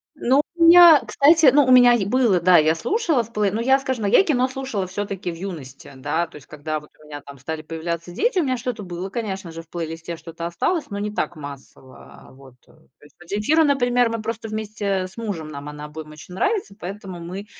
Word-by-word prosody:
Ну, 275 0 +2
у 340 - +1
меня, 340 -2 +9
кстати, 310 +1 +4
ну, 290 -1 +5
у 255 - +2
меня 245 -1 +7
е 225 -5 +1
было, 225 -3 +2
да, 180 0 +6
я 155 +1 +3
слушала 325 - 0
в 225 - -15
плей 210 -3 0
ну, 220 +3 -2
я, 265 +3 +3
скажем, 260 -4 -3
ну, 200 - +1
я - - +6
и - - +5
"Кино" 260 -6 +1
слушала 260 -7 -4
все-таки 195 -1 -5
в 165 - -8
юности. 160 -8 -9
Да, 150 +6 -2
то - - -19
есть, 145 - -13
когда 155 +1 -5
вот 150 - -18
у - - -17
меня 145 -1 -9
там 140 -1 -13
стали 155 +4 -5
появляться 170 +2 -5
дети, 390 - 0
у - - +2
меня 255 -3 -1
что-то 240 -3 -5
было, 180 +1 -6
конечно 195 -5 -5
же, 165 0 -8
в 165 - -23
плейлисте 165 0 -6
что-то 165 +1 -8
осталось, 295 - -2
но 200 -1 -5
не 210 0 -3
так 175 - -3
массово, 140 -3 -12
вот. 130 -1 -17
То - - -23 0.3
есть 145 - -20
Земфира, 250 +11 +2
например, 245 -4 +2
мы 230 -1 -4
просто 225 0 -5
вместе 205 -3 -3
с 185 - -19
мужем, 200 -9 -5
нам 145 0 -8
она 150 0 -8
обоим 155 0 -9
очень 155 +4 -13
нравится, 295 - -1
поэтому 190 -1 -7
мы, 185 +4 -7
195 Hz, 230 wpm, -22 LUFS, 160-245 Hz, 0.3 s, меня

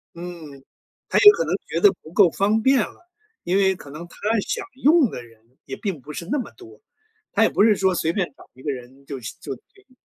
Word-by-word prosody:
嗯， 170 -6 -9 0.5
他 - - +1
也 415 - +10
可 465 +3 -1
能 - - 0
觉 - - -2
得 410 - +7
不 160 - -13
够 195 -3 +6
方 210 +5 +1
便 265 +2 +4
了， 350 - -5 0.3
因 180 +2 +1
为 190 -1 +3
可 145 - -13
能 155 +4 -9
他 - - -17 0.3
想 435 -4 -3 0.2
用 300 -2 +5
的 125 - -7
人 115 -2 -19 0.2
也 135 - -6
并 190 -8 -4
不 150 +4 -10
是 170 - -6
那 295 - +1
么 250 - -5
多， 380 +3 -16 0.5
他 - - +3
也 - - +4
不 - - +2
是 215 -1 +5
说 190 -1 +2
随 165 -1 0
便 185 -2 0
找 - - -16
一 130 - -17
个 145 - -2
人 130 +1 -10
就 140 -2 -6
行 115 - -8
就 140 - -5
可 - - -21 0.3
以。 255 - -26
180 Hz, 260 characters per minute, -23 LUFS, -, 0.5 s, 也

